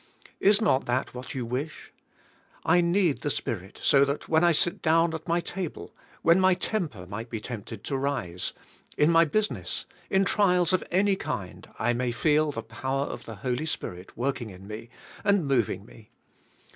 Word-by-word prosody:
Is 205 +1 +5
not 205 -12 +2
that 125 +2 0
what 130 +5 -7
you 125 -2 -2
wish? 130 +7 -5 0.7
I 175 +2 +5
need 170 -3 +2
the 145 - -1
Spirit 95 -8 -4
so 140 -1 +6
that 140 +1 -2
when 160 +1 +3
I 175 - +6
sit 170 +2 +2
down 165 +1 +3
at 160 +2 -6
my 170 +1 +2
table, 180 -2 -5 0.3
when 170 +3 +6
my 185 -1 +5
temper 175 - -3
might 115 +5 -6
be 115 - -3
tempted 110 -1 -7
to 140 - -2
rise, 125 -11 -2 0.5
in 150 +3 +5
my 165 0 +6
business, 215 +8 -1 0.2
in 195 0 +3
trials 180 -3 +3
of 185 - +2
any 195 +2 +3
kind 100 - -5
I 120 +1 +1
may 125 0 0
feel 150 +5 +2
the - - -5
power 135 +1 -2
of - - -7
the - - -7
Holy 125 +5 0
Spirit 90 - -5
work 130 +2 -1
ing 115 - -5
in 95 0 -12
me, 110 +3 -8 0.3
and 200 -5 +3
moving 115 -8 +1
me. 110 -1 -16
140 Hz, 185 wpm, -27 LUFS, 120-175 Hz, 0.7 s, so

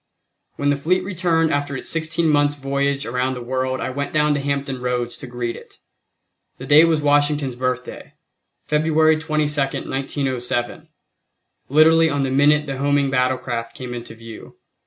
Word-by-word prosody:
When 145 - 0
the 145 - +2
fleet 180 +6 0
returned 170 -4 0
after 145 -1 -2
its - - -8
sixteen 165 0 -1
months' 145 -1 +2
voyage 140 0 -1
around 125 +2 -1
the 125 - -7
world 130 +1 -2
I - - -3
went 140 +2 -4
down 150 -1 +2
to 145 - -1
Hampton 140 -2 -3
Roads 125 -1 -2
to 135 - -8
greet 120 -1 -4
it. - - -14 0.8
The - - -8
day 150 +3 +7
was 160 -2 +1
Washington's 145 -2 +1
Birthday, 125 0 -4 0.5
February 155 +1 +3
22, 155 -1 0
1907. 135 +1 -3 0.8
Literally 160 +3 +5
on 145 -2 0
the 135 - -1
minute 150 +2 +3
the 135 -2 -4
homing 140 -1 +1
battlecraft 125 -3 -1
came 125 -1 -7
into 120 -1 -8
view. 115 -1 -12
140 Hz, 155 wpm, -21 LUFS, 130-150 Hz, 0.8 s, day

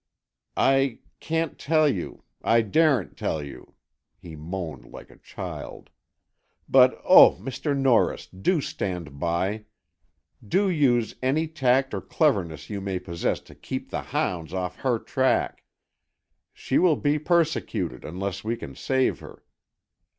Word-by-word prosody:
"I 135 -2 +3 0.2
can't 165 -1 -2
tell 155 0 +3
you——I 115 0 -1
daren't 135 - +2
tell 80 -2 -2
you," 70 -1 -11 0.4
he 85 -3 -11
moaned 80 -5 -6
like - - -12
a - - -18
child. - - -8 0.8
"But - - +5
oh, - - +8
Mr. 135 - -3
Norris, 135 -4 +2
do 150 - -1
stand 90 - -5
by! 95 +6 -1 0.8
Do 195 - +1
use 125 -8 +2
any 145 +5 +1
tact 135 -3 +1
or - - -2
cleverness 95 - 0
you 100 -2 -5
may 95 -1 -2
possess 85 -2 -2
to - - -16
keep - - -6
the - - -2
hounds 85 -1 -3
off 90 -1 -3
her 125 -3 0
track! 130 +3 0 0.9
She - - -1
will 175 -4 +4
be 145 +1 +1
persecuted, 165 0 0
unless 95 +3 -5
we 115 +2 -1
can 70 - -9
save 130 - 0
her!" - - -13
115 Hz, 130 wpm, -25 LUFS, 90-145 Hz, 0.9 s, oh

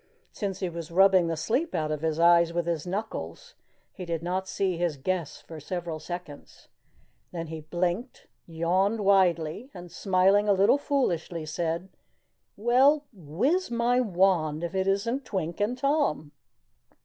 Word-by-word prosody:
Since 195 -2 -4
he 185 - -1
was 170 -1 -7
rubbing 185 0 +5
the 165 -1 -2
sleep 250 - -1
out 155 -2 -1
of 150 -1 -3
his 160 0 -1
eyes 170 0 +5
with 175 0 -1
his 170 -1 -2
knuckles, 220 - -5 0.4
he 185 - -8
did 170 -2 -3
not 185 +2 -2
see 190 -1 -1
his 170 -3 -1
guests 170 +2 -3
for 160 -1 -10
several 170 0 -5
seconds. 175 -2 -9 0.6
Then 165 -2 -5
he 160 -1 -6
blinked, 180 - -3 0.2
yawned 185 +6 0
widely, 190 - +2
and 175 -1 -10
smiling 195 +3 +2
a - - +6
little 200 +8 +4
foolishly 175 - -1
said: 170 +3 -3 0.7
"Well, 265 +7 +4
wiz 210 - -1
my 240 +1 +1
wand 175 -7 +1
if 170 - -3
it 190 0 0
isn't 230 +8 0
Twink 175 -7 -4
and 230 +5 0
Tom." 275 - 0
180 Hz, 150 wpm, -27 LUFS, 165-205 Hz, 0.7 s, a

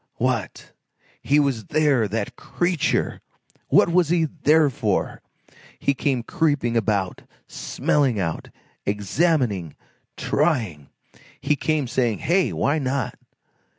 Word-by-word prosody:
What! - - -2 0.5
he 145 +2 +3
was 135 -7 0
there, 145 -8 +2
that 105 +1 -3
creature! 175 -3 -1 0.5
What - - +4
was 170 -2 +3
he 170 -1 +3 0.2
there 155 -1 +4
for? 105 -5 -1 0.6
He 140 - +1
came 135 -3 -1
creeping 145 -5 0
about, 100 -4 0 0.3
smelling 135 -7 0
out, 80 -4 -3 0.3
examining, 105 - 0 0.4
trying! 115 - 0 0.5
He 150 - +1
came, 150 -2 0
saying: 120 -3 0
"Hey! 180 +2 +1
Why 145 +3 0
not?" 135 -2 -2
135 Hz, 110 wpm, -23 LUFS, 110-155 Hz, 0.6 s, What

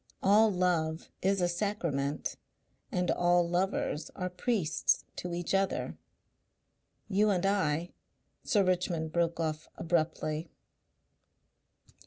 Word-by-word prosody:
All 210 +3 +6
love 175 -3 0
is 195 0 +2
a 175 - +3
sacrament 170 -7 -1 0.6
and 180 0 +1
all 175 0 +3
lovers 175 -3 -1
are 180 0 -3
priests 180 -4 +1
to 180 - -4
each 175 +1 -2
other. 195 0 0 1.1
You 210 +1 +3
and 190 -2 +1
I 175 -4 +1 0.3
" - - -46 0.2
Sir 205 -4 +3
Richmond 175 -3 0
broke 170 0 0
off 155 -1 -2
abruptly. 160 -1 -1
175 Hz, 110 wpm, -31 LUFS, 165-195 Hz, 1.1 s, All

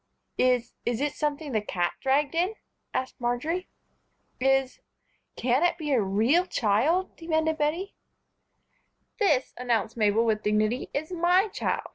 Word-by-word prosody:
"Is 250 -2 +2
is 240 -1 -1
it 290 +1 -1
something 295 -1 -2
the 215 -3 +1
cat 175 -4 -1
dragged 280 +3 +1
in?" 360 +6 0 0.4
asked 260 -1 -4
Marjory. 300 +10 -1 0.7
"Is 270 0 +1 0.6
can 250 +3 +1
it 350 0 +2
be 305 -3 -3
a 255 -5 +3
real 225 - +2
child?" 270 - +1
demanded 320 -1 -1
Bettie. 330 +7 -1 1.3
"This," 300 - +2
announced 235 -3 -1
Mabel, 215 +1 +3
with 215 -2 +1
dignity, 215 +4 0
"is 310 +4 -3
my 360 +4 +3
child. - - -2
270 Hz, 135 wpm, -27 LUFS, 230-325 Hz, 1.3 s, a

